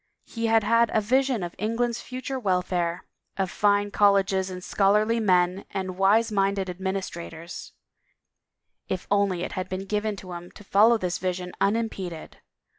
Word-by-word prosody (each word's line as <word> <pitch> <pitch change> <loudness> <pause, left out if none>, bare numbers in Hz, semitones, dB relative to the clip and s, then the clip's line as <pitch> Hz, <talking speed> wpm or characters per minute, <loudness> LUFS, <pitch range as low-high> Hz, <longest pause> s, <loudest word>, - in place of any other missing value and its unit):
He 230 -1 -3
had 225 -1 +4
had 230 +2 +3
a - - +5
vision 255 0 +1
of 175 0 -5
England's 230 +3 -1
future 260 +1 -5
welfare, 180 -4 -1 0.3
of 190 -2 -1
fine 205 0 +2
colleges 195 -2 +3
and 180 -1 -7
scholarly 210 +4 +2
men 185 -2 +2
and 185 -1 -4
wise 205 +4 +3
minded 195 -2 0
administrators 175 -2 -6 0.5
— - - -59 0.3
if 185 -1 -3
only 200 -3 +2
it - - -4
had 185 0 -4
been 185 +1 -4
given 210 +1 -1
to 185 -1 -10
him 175 0 -8
to 205 - -13
follow 215 +4 +5
this 180 -4 -2
vision 180 0 -3
unimpeded! 200 -6 -2
195 Hz, 155 wpm, -26 LUFS, 185-215 Hz, 0.5 s, a